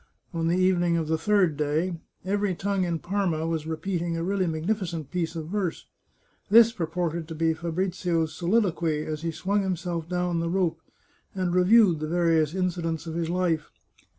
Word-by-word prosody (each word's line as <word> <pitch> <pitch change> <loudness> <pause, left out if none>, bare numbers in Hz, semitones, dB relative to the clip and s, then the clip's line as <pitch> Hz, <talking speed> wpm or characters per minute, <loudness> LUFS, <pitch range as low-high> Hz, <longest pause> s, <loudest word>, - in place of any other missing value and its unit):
On 165 -1 -1
the 170 +2 +2
evening 175 -2 +3
of 160 -2 -1
the 160 - +1
third 185 -3 +3
day, 155 +5 0 0.3
every 200 -1 0
tongue 195 0 0
in 170 -1 -1
Parma 175 -3 -1
was 160 -2 -2
repeating 170 +1 -2
a 165 - -2
really 190 0 0
magnificent 165 -2 -2
piece 170 -2 -2
of 160 -1 -5
verse. 195 -4 -2 0.6
This 230 +2 +7
purported 170 -4 -2
to 160 - -6
be 165 +1 +2
Fabrizio's 170 0 -1
soliloquy 170 -5 +1
as 155 -1 -4
he 165 - -2
swung 200 +5 0
him 190 -2 0
self 170 -1 -4
down 180 -1 0
the 165 0 -1
rope, 170 -3 0 0.5
and 185 -2 -1
reviewed 180 -1 +5
the 155 - -3
various 165 -1 +2
incidents 170 -3 -1
of 165 - -5
his 165 0 -2
life. 170 -3 0
170 Hz, 175 wpm, -26 LUFS, 160-185 Hz, 0.6 s, This